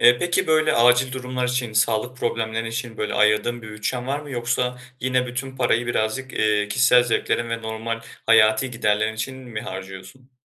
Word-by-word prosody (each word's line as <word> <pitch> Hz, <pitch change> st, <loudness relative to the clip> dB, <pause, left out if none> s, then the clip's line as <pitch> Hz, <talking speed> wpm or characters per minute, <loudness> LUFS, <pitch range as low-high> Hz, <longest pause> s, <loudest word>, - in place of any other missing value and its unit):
Eee, 120 Hz, 0 st, +6 dB
peki 175 Hz, +3 st, 0 dB
böyle 155 Hz, -1 st, +3 dB
acil 125 Hz, +2 st, +4 dB
durumlar 125 Hz, -1 st, -3 dB
için, 125 Hz, -2 st, -2 dB
sağlık 110 Hz, +3 st, +1 dB
problemleri 115 Hz, -2 st, -2 dB
için, 115 Hz, 0 st, -5 dB
böyle 105 Hz, -, -2 dB
ayırdığın 105 Hz, +3 st, +2 dB
bir 110 Hz, -, -9 dB
bütçen 120 Hz, +4 st, -3 dB
var 140 Hz, +2 st, -2 dB
mı? 150 Hz, -1 st, -10 dB
Yoksa 125 Hz, 0 st, -1 dB, 0.2 s
yine 130 Hz, 0 st, +1 dB
bütün 130 Hz, +2 st, -5 dB
parayı 120 Hz, -2 st, +1 dB
birazcık, 120 Hz, +3 st, -2 dB
eee, 105 Hz, -1 st, +1 dB
kişisel 125 Hz, +2 st, +5 dB
zevklerin 120 Hz, 0 st, 0 dB
ve 115 Hz, 0 st, -3 dB
normal 110 Hz, +1 st, -4 dB, 0.3 s
hayati 110 Hz, +2 st, +4 dB
giderlerin 110 Hz, -2 st, 0 dB
için 130 Hz, +4 st, -4 dB
mi 120 Hz, -5 st, -7 dB
harcıyorsun? 95 Hz, +6 st, -9 dB
120 Hz, 170 wpm, -23 LUFS, 110-125 Hz, 0.3 s, Eee